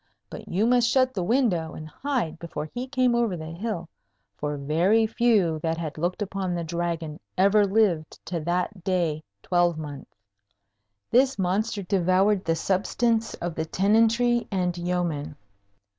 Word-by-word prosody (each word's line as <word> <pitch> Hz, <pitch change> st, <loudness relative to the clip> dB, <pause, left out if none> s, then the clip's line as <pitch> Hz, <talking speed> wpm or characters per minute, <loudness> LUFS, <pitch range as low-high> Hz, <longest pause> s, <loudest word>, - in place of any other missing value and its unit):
But -, -, -9 dB
you 195 Hz, +5 st, +1 dB
must 240 Hz, 0 st, +3 dB
shut 255 Hz, 0 st, +3 dB
the 190 Hz, -, -2 dB
window 180 Hz, -, +1 dB
and 155 Hz, -, -8 dB
hide 200 Hz, -, -3 dB
before 160 Hz, -3 st, -5 dB
he 245 Hz, +11 st, -6 dB
came 255 Hz, -2 st, +2 dB
over 235 Hz, -6 st, +1 dB
the 160 Hz, 0 st, -7 dB
hill; 175 Hz, -1 st, -4 dB, 0.5 s
for 150 Hz, +5 st, -3 dB
very 170 Hz, +11 st, +2 dB
few 215 Hz, -8 st, +2 dB
that 160 Hz, +1 st, -1 dB
had 160 Hz, -3 st, -4 dB
looked 175 Hz, +6 st, -1 dB
upon 190 Hz, -2 st, -3 dB
the 170 Hz, -, -2 dB
Dragon 165 Hz, -1 st, -3 dB, 0.2 s
ever 200 Hz, +2 st, +4 dB
lived 190 Hz, -7 st, +1 dB
to 170 Hz, -1 st, -3 dB
that 180 Hz, +3 st, -2 dB
day 175 Hz, -5 st, 0 dB, 0.2 s
twelvemonth. 160 Hz, -5 st, 0 dB, 1.0 s
This 260 Hz, +1 st, +4 dB
monster 200 Hz, +3 st, -1 dB
devoured 190 Hz, +2 st, +2 dB
the 165 Hz, -, +1 dB
substance 225 Hz, +6 st, 0 dB
of 175 Hz, -1 st, -4 dB
the 160 Hz, 0 st, -3 dB
tenantry 225 Hz, +6 st, +2 dB
and 180 Hz, -3 st, 0 dB
yeomen. 175 Hz, -5 st, -2 dB
180 Hz, 145 wpm, -25 LUFS, 165-220 Hz, 1.0 s, ever